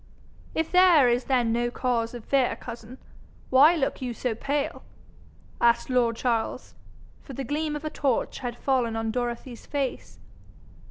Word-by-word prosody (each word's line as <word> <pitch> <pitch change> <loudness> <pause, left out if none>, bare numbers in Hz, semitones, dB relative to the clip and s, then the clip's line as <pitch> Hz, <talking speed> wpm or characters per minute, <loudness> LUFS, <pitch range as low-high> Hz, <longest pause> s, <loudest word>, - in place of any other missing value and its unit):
'If 320 0 -1
there 360 -7 +6
is 240 +1 +1
then 245 -4 +1
no 240 +1 0
cause 240 -1 -1
of 235 - -9
fear, 270 -3 +2
cousin, 235 +1 -9 0.5
why 290 +6 +7
look 275 -4 -2
you 245 -2 -4
so 245 +1 -2
pale?' 280 +5 -2 0.8
asked 235 +2 +3
lord 240 -2 +2
Charles, 230 -2 -2 0.5
for 275 - -11
the 270 - -4
gleam 300 +3 -2
of 295 +1 -6
a 310 - -3
torch 270 -5 -1
had 245 -2 -5
fallen 250 -4 0
on 225 0 -2
Dorothy's 240 0 -4
face. 280 -3 -3
250 Hz, 155 wpm, -26 LUFS, 235-275 Hz, 0.8 s, why